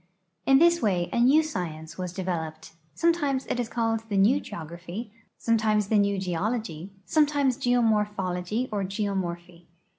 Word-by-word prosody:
In 270 - +7
this 340 +3 +4
way 180 -5 0
a - - +1
new 275 +6 +5
science 165 - -5
was 180 -1 -4
developed; 165 -4 -4 0.2
some 335 - +3
times 280 -5 -1
it 245 - -2
is 240 -2 -2
called 225 -1 -1
the 200 - 0
new 225 +9 +4
geograph3^ 175 +4 -7 0.3
sometimes 215 -3 +1
the 215 - +4
new 200 0 +2
geology, 190 -1 -3
sometimes 290 -4 +2
geomorphologj" 210 -4 0
or 205 -2 -1
geomor})hy. 180 -4 -4
210 Hz, 145 wpm, -26 LUFS, 180-245 Hz, 0.3 s, In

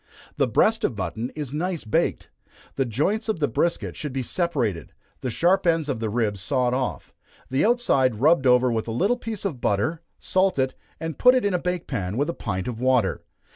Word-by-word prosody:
The - - +3
breast - - +2
of - - 0
mutton 115 +3 -3
is 145 -3 -5
nice 170 0 -2
baked. 110 - 0 0.5
The 135 - +1
joints 185 - -1
of 220 - 0
the 145 - +2
brisket 170 +8 -1
should 150 -4 -5
be 130 -1 -2
separated, 125 - -1 0.3
the 130 - -3
sharp 180 - +2
ends 165 -3 +2
of 130 -5 -1
the 110 -1 -2
ribs 105 -3 -1
sawed 125 +3 0
off, 130 -1 -3 0.4
the 130 - +2
outside 210 - +2
rubbed 140 0 +4
over 125 0 +5
with 115 -1 -2
a - - -3
little 195 - +2
piece 220 -4 -5
of 145 -11 -3
butter 105 +12 0 0.2
salt 185 -2 +1
it, 130 -1 +1 0.3
and 160 -1 -5
put 250 0 +7
it 255 - +1
in 200 - +1
a 180 - +1
bake 180 -1 -2
pan, 100 -5 -3
with 145 +5 +1
a - - -8
pint 95 - -4
of 120 -2 -4
water. 125 -7 +2
135 Hz, 210 wpm, -24 LUFS, 120-175 Hz, 0.5 s, put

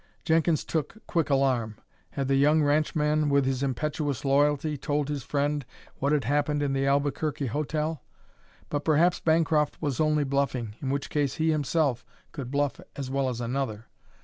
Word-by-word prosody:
Jenkins 160 -1 +2
took 160 +7 -3
quick 165 -4 0
alarm. 130 -6 +1 0.4
Had 135 -1 -2
the 135 - +2
young 150 +3 +4
ranchman, 150 0 +2
with 140 -1 +3
his 130 -1 -1
impetuous 140 0 -2
loyalty, 145 +2 +2
told 145 0 -1
his 145 -2 -2
friend 145 +2 -1 0.4
what 140 +2 +1
had 150 -3 +2
happened 145 +3 +1
in 140 -1 0
the 135 0 +1
Albuquerque 140 +1 0
hotel? 150 +3 -2 0.7
But 145 0 -2
perhaps 165 +3 +3
Bancroft 160 -2 +2
was 145 -5 -2
only 155 -1 +2
bluffing, 135 -5 -1
in 135 - -2
which 140 0 -2
case 145 -3 0
he 160 -1 +1
himself 145 -4 0 0.3
could 130 -4 -6
bluff 145 0 0 0.2
as 135 -2 -5
well 135 -1 +1
as 120 -2 -4
another. 120 -3 -3
145 Hz, 165 wpm, -27 LUFS, 135-150 Hz, 0.7 s, young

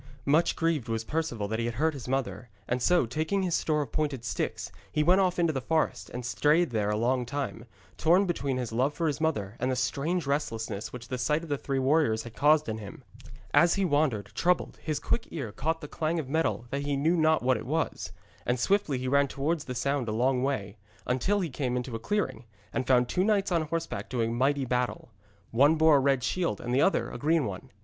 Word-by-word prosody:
Much 155 +4 +3
grieved 165 -8 0
was 115 0 -1
Perceval 150 -7 -2
that 110 +2 -2
he 115 - -1
had 120 -1 -3
hurt 160 +5 +1
his 135 -4 -8
mother, 125 -2 -2 0.2
and 125 +1 -1
so, 175 0 +3
taking 160 - -1
his 180 -2 -1
store 150 -2 +1
of 125 - -11
pointed 145 -6 -2
sticks, - - -3 0.2
he 150 - +1
went 185 +4 +5
off 185 -1 +1
into 170 -2 +2
the 135 - -2
forest, 160 +4 -1
and 125 0 -6
strayed 150 +5 +2
there 105 -3 0
a 105 - 0
long 125 +3 +1
time, 135 -2 -4 0.3
torn 175 +5 +4
between 140 -7 -1
his 125 -3 -3
love 130 +6 0
for 170 - -1
his 150 -1 -1
mother, 110 -11 -1
and 125 - 0
the 130 - +1
strange 150 +6 -1
restlessness 115 -7 -2
which 120 -2 -9
the 130 -1 -3
sight 150 +6 +1
of 165 - -9
the 145 - 0
three 135 -1 -2
warriors 135 -5 +2
had 120 - -10
caused 150 +2 +4
in 110 0 -3
him. 100 -2 -10 0.5
As 170 0 +5
he 195 -1 +1
wandered, 145 - +1
troubled, 180 +1 0
his 155 -2 -2
quick 235 - -1
ear 135 -10 -5
caught 160 +8 -2
the 150 - -6
clang 160 +2 -2
of 155 -5 -3
metal, 155 -4 0
though 140 - -1
he 140 0 -1
knew 160 +5 +2
not 160 -3 +3
what 130 0 +3
it - - -8
was. 160 +3 -2 0.3
And 125 0 0
swiftly 175 -1 +1
he 130 +1 -3
ran 140 +2 +3
towards 145 +4 -2
the 125 - -5
sound 140 0 -1
a - - -1
long 125 +3 +1
way, 110 -7 -2 0.3
until 190 +12 +1
he 175 - -2
came 125 -2 -1
into 125 -1 -4
a - - -3
clearing, 130 - -2 0.3
and 130 - -2
found 125 -2 +4
two 180 - +1
knights 200 -2 +1
on 170 -2 +2
horseback 165 +1 -4
doing 115 -2 -1
mighty 135 +2 +1
battle. 125 -1 -2 0.4
One 140 +7 +5
bore 160 -2 +5
a - - +4
red 135 -1 +2
shield 170 +9 -1
and 120 - -4
the 135 - +3
other 195 - +2
a - - -7
green 155 0 +2
one. 95 -3 -6
140 Hz, 230 wpm, -28 LUFS, 125-160 Hz, 0.5 s, went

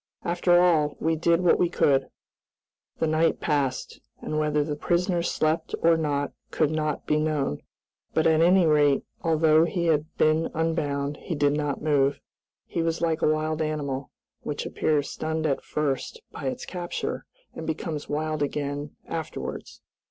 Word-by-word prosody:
After 175 0 +3
all, 155 -5 +3
we 160 +1 +1
did 170 +2 +2
what 180 - +4
we 175 - +3
could." 135 -4 +2 0.9
The - - +1
night 160 +1 +2
passed, 140 -4 -1 0.2
and 155 - -3
whether 150 -1 +1
the 150 0 -3
prisoner 175 +3 0
slept 160 -1 0
or 165 0 +6
not 145 -3 -1 0.2
could 155 -1 +1
not 155 -2 -2
be 150 - +2
known, 150 - -1 0.5
but 160 - +1
at 160 -1 +4
any 180 +1 +5
rate, 150 -3 +4 0.2
although 160 -1 +4
he 170 0 -2
had 155 -2 +2
been 155 +1 +3
unbound, 150 -3 -1
he 170 - -5
did 145 -1 +2
not 145 -1 -2
move. 140 -2 +2 0.5
He 170 - -2
was 165 0 -1
like 165 -1 0
a - - +4
wild 155 +1 -1
animal, 145 -3 -2 0.3
which - - -4
appears 145 -2 0
stunned 160 0 -3
at 140 -3 0
first 150 - -2
by - - -7
its 255 -1 -3
capture, 175 -2 -4 0.3
and 160 - -7
becomes 160 -1 -4
wild 155 +1 -2
again 145 0 -3
afterwards. - - -6
155 Hz, 160 wpm, -26 LUFS, 145-165 Hz, 0.9 s, or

